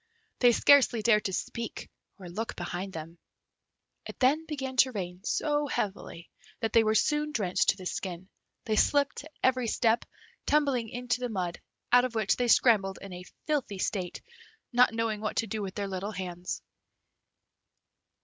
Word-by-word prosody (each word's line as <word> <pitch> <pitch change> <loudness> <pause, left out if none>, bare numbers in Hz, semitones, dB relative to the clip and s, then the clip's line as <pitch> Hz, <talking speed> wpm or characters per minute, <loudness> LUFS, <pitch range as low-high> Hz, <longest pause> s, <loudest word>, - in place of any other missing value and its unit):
They 245 -1 +6
scarcely 245 -3 +5
dared 210 -2 +4
to 190 - -1
speak 230 +4 -4 0.3
or 185 -3 -10
look 215 +6 -4
behind 190 +1 -4
them. 165 +1 -8 0.9
It - - -9
then 295 +5 +2
began 265 -4 -4
to 260 0 +5
rain 180 -4 -6
so 295 -1 0
heavily 190 -7 -4 0.3
that 225 - -2
they 230 - +6
were 215 0 +1
soon 300 +4 +1
drenched 195 -9 +1
to - - +2
the 185 - -9
skin; 180 0 -4 0.4
they 220 - 0
slipped 285 +2 +2
at 310 - -13
every 255 -2 +2
step, 225 +1 +2 0.4
tumbling 275 -6 +2
into 245 +1 -2
the 250 -1 -3
mud, 180 -5 -3 0.3
out 245 0 +7
of 250 -2 -3
which 215 -3 +2
they 245 - 0
scrambled 210 -5 +4
in 195 -2 -9
a 180 0 -8 0.2
filthy 280 -10 -1
state, 185 -2 -3 0.5
not 245 0 +5
knowing 225 -2 -2
what 215 - -3
to - - +1
do 215 0 -4
with 195 -1 -5
their 200 -1 -2 0.3
hands. 180 -1 -5
225 Hz, 165 wpm, -29 LUFS, 190-255 Hz, 0.9 s, out